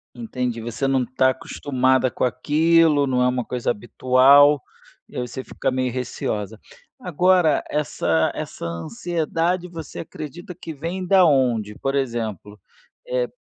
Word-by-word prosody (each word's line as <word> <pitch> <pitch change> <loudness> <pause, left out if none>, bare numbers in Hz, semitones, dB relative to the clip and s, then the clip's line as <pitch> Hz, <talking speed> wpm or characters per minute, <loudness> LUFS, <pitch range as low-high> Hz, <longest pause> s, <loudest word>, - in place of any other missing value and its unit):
Entendi, 125 - -3
você 120 +4 -3
não 130 -2 +1
tá 130 +2 +2
acostumada 130 -1 0
com - - -4
aquilo, 150 +4 +3
não 125 -2 0
é 125 - +4
uma 125 -1 -1
coisa 125 -2 -3
habitual, 130 +5 +4 0.5
e, - - -17
aí, - - -2
você 130 +2 -7
fica - - -3
meio 130 -1 -1
receosa, 110 -4 -4 0.4
agora, 180 -2 +2
essa 105 - 0
essa - - -6
ansiedade, 165 - -2
você 165 -3 -8
acredita 170 +3 -8
que 160 - -7
vem 170 +6 -5
da 190 0 +5
onde? 120 -8 +1
Por 135 0 -2
exemplo, 110 -6 -3 0.5
é, - - 0
130 Hz, 140 wpm, -22 LUFS, 125-165 Hz, 0.5 s, da